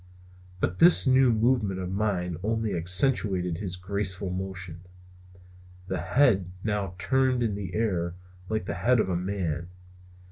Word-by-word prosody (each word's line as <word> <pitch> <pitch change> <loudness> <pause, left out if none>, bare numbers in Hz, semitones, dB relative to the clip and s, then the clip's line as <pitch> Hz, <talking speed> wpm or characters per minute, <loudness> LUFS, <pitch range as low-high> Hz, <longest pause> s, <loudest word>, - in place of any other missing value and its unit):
But 90 - -2
this 175 -2 +6
new 130 -1 +5
movement 110 -4 +1
of 90 -1 -4
mine 95 -4 -1
only 110 0 -1
accentuated 90 -1 +2
his 95 -3 -3
graceful 95 0 -3
motion. 90 -2 -5 1.1
The 95 -2 -2
head 95 - +2
now 105 -4 -2
turned 130 +4 +1
in 110 -3 0
the 100 -2 -5
air, 90 -6 -1 0.3
like 110 -4 -2
the - - -3
head 125 0 +2
of 95 - +1
a 90 - 0
man. 90 -3 -3
95 Hz, 140 wpm, -27 LUFS, 90-110 Hz, 1.1 s, this